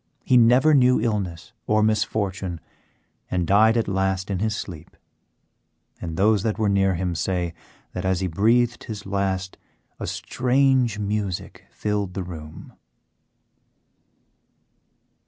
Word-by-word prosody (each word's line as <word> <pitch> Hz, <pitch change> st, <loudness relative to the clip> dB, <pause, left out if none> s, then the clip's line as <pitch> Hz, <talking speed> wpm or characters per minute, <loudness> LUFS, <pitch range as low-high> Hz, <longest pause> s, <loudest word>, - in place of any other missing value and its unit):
He 130 Hz, -, +2 dB
never 125 Hz, +6 st, +5 dB
knew 125 Hz, -2 st, +5 dB
illness 105 Hz, -1 st, -3 dB
or 105 Hz, 0 st, +3 dB
misfortune, 100 Hz, -4 st, -1 dB, 0.7 s
and 90 Hz, -2 st, 0 dB
died 110 Hz, +5 st, +4 dB
at 115 Hz, -, 0 dB
last 95 Hz, 0 st, -1 dB
in 95 Hz, -, -1 dB
his 110 Hz, +1 st, 0 dB
sleep; 85 Hz, -5 st, -8 dB, 1.0 s
and 80 Hz, -2 st, -5 dB
those 105 Hz, +1 st, +3 dB
that 110 Hz, +1 st, -1 dB
were 110 Hz, -2 st, +1 dB
near 95 Hz, -1 st, +2 dB
him 90 Hz, 0 st, -2 dB
say 90 Hz, 0 st, -2 dB, 0.4 s
that -, -, -5 dB
as 95 Hz, -1 st, +1 dB
he 95 Hz, -, -1 dB
breathed 115 Hz, +7 st, +1 dB
his 105 Hz, -2 st, -7 dB
last 95 Hz, -1 st, -2 dB, 0.4 s
a -, -, -4 dB
strange 130 Hz, -3 st, +1 dB
music 105 Hz, -3 st, -3 dB
filled 105 Hz, -3 st, -3 dB
the 95 Hz, -, -2 dB
room. 80 Hz, -3 st, -10 dB
100 Hz, 125 wpm, -23 LUFS, 95-110 Hz, 1.0 s, never